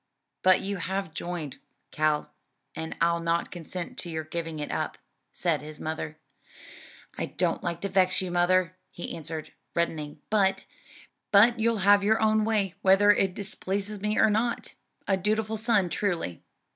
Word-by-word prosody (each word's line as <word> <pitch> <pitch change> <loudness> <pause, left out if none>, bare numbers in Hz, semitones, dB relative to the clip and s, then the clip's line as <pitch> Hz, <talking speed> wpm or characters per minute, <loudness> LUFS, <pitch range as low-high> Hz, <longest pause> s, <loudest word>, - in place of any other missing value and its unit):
"But 185 0 +5
you 200 0 -3
have 190 -1 -3
joined, 170 -4 -5 0.3
Cal, 155 -1 0 0.4
and 160 0 -5
I'll 170 0 +2
not 170 0 0
consent 175 0 -6
to 175 - -3
your 160 -1 -3
giving 165 0 -4
it 150 -1 -4
up," - - -2 0.3
said - - 0
his 150 0 -9
mother. 155 0 -4 1.0
"I - - -1
don't - - -1
like 170 -1 -3
to 200 - -1
vex 185 -1 +3
you, 185 -2 -2
mother," 180 0 +2 0.2
he 175 - -5
answered, 160 0 -6 0.2
reddening, 155 -3 -2
"but 195 -3 +2 0.3
" - - -19 0.3
"But 230 +3 +6
you'll 230 0 +2
have 205 0 +6
your 220 +2 +3
own 215 -1 +3
way, 210 -5 +1
whether 195 +2 +6
it 195 -3 +1
displeases 200 0 -3
me 210 +1 0
or 220 - +5
not? 230 +3 -1 0.3
A 195 - +3
dutiful 215 +3 0
son, 215 -4 +2
truly." 170 - -2
185 Hz, 160 wpm, -27 LUFS, 165-205 Hz, 1.0 s, But